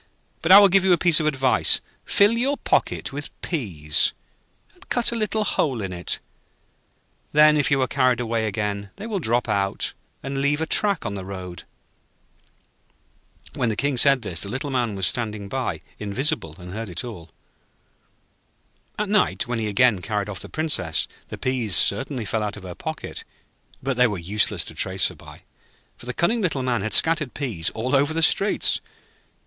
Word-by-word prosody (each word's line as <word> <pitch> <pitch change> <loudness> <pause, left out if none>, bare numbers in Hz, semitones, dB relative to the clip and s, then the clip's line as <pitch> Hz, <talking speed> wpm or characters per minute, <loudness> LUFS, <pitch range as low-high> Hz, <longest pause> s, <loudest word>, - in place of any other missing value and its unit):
'But 165 - +1
I 195 - +12
will 200 0 +8
give 195 0 +3
you 190 -1 +4
a - - +4
piece 170 -2 +4
of 155 - 0
advice. 135 -3 +3 0.3
Fill 205 +1 +4
your 255 +5 0
pocket - - -1
with 145 +1 -5
peas, 85 - -1 0.6
and 375 0 -22
cut 240 -1 +1
a - - -3
little 215 -1 -1
hole 135 - 0
in 95 -3 -4
it, 90 0 -3 1.2
then 150 0 +6
if 145 -2 +2
you 140 -2 +2
are - - -1
carried 130 -3 +2
away 115 -2 -1
again, 100 -1 -3
they 205 - -8
will 215 -4 -2
drop 120 -6 0
out 100 -1 -1 0.3
and 135 0 -3
leave 145 +2 +1
a 160 - -1
track 200 0 +1
on - - -3
the 95 -2 -6
road.' 95 -2 -8 1.9
When 125 -3 -1
the 110 - -1
King 140 +4 0
said 135 0 +4
this, 85 -5 -4
the 100 - -4
Little 135 +5 -4
Man 120 -5 -1
was 95 -1 +1
standing 110 -4 0
by, 130 +5 -3 0.2
invisible, 105 - -1
and 90 0 -10
heard 110 0 -5
it 85 - -5
all. 95 -9 -9 1.7
At 210 - -1
night, 210 +1 +1
when 120 -1 -2
he 110 - -2
again 105 -1 +3
carried 105 0 -3
off 100 - -6
the - - -2
Princess, 140 - 0 0.2
the - - -8
peas 125 -7 0
certainly 125 - +4
fell 110 +2 -1
out 105 -1 -3
of 105 - -11
her 90 -1 -7
pocket, - - -7 0.6
but 130 -1 -2
they 125 0 +5
were 105 -3 -3
useless 100 +5 0
to - - -7
trace 95 -1 0
her - - -12
by, - - -14 0.5
for 120 - -13
the 125 - -3
cunning 225 +7 +1
Little 155 -9 -1
Man 120 -4 0
had 110 +1 -3
scattered 160 -5 +3
peas 115 - -2
all 125 +5 -1
over 145 +3 +2
the 165 - +1
streets. 200 +5 +3
125 Hz, 185 wpm, -23 LUFS, 100-155 Hz, 1.9 s, I